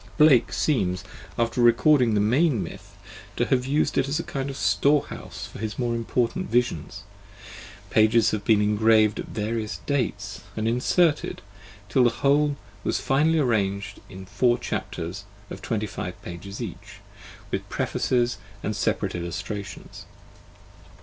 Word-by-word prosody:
Blake 150 -5 +5
seems, 90 - 0 0.3
after 115 +1 0
recording 120 +1 +5
the - - +3
main 120 - +2
myth, 100 +4 -10 0.4
to 120 - +1
have 130 -1 +1
used 145 +3 +1
it 135 - 0
as 145 - 0
a - - -2
kind 135 0 -4
of 135 - -6
storehouse 145 +1 0
for - - -11
his 110 0 -4
more 120 -2 0
important 120 +9 -1
visions: 100 -5 -1 0.9
pages 110 +1 +4
have 105 -2 -2
been 105 0 +4
engraved 110 0 +3
at - - -5
various 110 0 -3
dates 105 -7 -2 0.2
and 110 0 0
inserted, 145 +7 +1 0.4
till 130 +4 +3
the 120 - +5
whole 145 +4 +2 0.3
was - - 0
finally 155 +4 +2
arranged 105 -6 0
in 95 0 -9
four 120 +5 +2
chapters 95 -3 -5 0.3
of - - -7
twenty 110 -2 -2
five 90 -2 -6
pages 90 +3 -8
each, - - -7 0.6
with - - -3
prefaces 120 -1 0 0.2
and - - -2
separate - - -1
illustrations. 85 +4 -6
115 Hz, 140 wpm, -25 LUFS, 100-130 Hz, 0.9 s, Blake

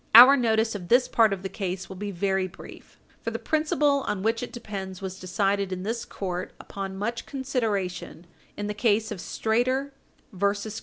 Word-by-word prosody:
Our 255 +4 +12
notice 225 -3 +2
of 185 -4 -6
this 245 +4 +5
part 225 -2 +4
of 195 -1 -3
the - - -1
case 190 -1 -4
will 190 - -8
be 205 +2 -4
very 190 0 0
brief, 185 - -13 0.2
for - - -2
the - - -3
principle 300 -2 +2
on 195 -2 -1
which 225 +1 +1
it 245 - -5
depends 195 -6 -6
was 190 -1 -6
decided 195 +1 0
in 185 0 -3
this 225 +3 -2
court, 180 -2 -4
upon 195 -1 -6
much 230 +4 -3
consideration, 220 - -2 0.3
in 205 - -3
the 210 - -2
case 220 0 +1
of 205 - -4
Strader 255 +9 0 0.4
et 180 - -12 0.2
al. 220 - -5
205 Hz, 190 wpm, -26 LUFS, 190-235 Hz, 0.4 s, Our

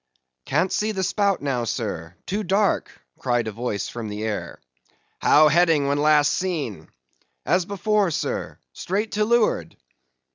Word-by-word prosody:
"Can't 165 +6 +1
see 215 +1 0
the 190 -2 -2
spout 200 -2 +1
now, 130 -4 -1
sir;—too 110 - -4
dark"—cried 170 - -1
a - - -2
voice 110 -1 -3
from 115 -3 -6
the 105 +1 -5
air. 110 -2 -4 0.6
"How 155 +1 +6
heading 160 -2 +3
when 140 +1 +1
last 150 0 +4
seen?" 145 - -3 0.6
"As 180 0 +1
before, 200 0 +1
sir,—straight 200 +5 -3
to 210 +1 +1
leeward." 235 0 +1
155 Hz, 130 wpm, -23 LUFS, 120-195 Hz, 0.6 s, How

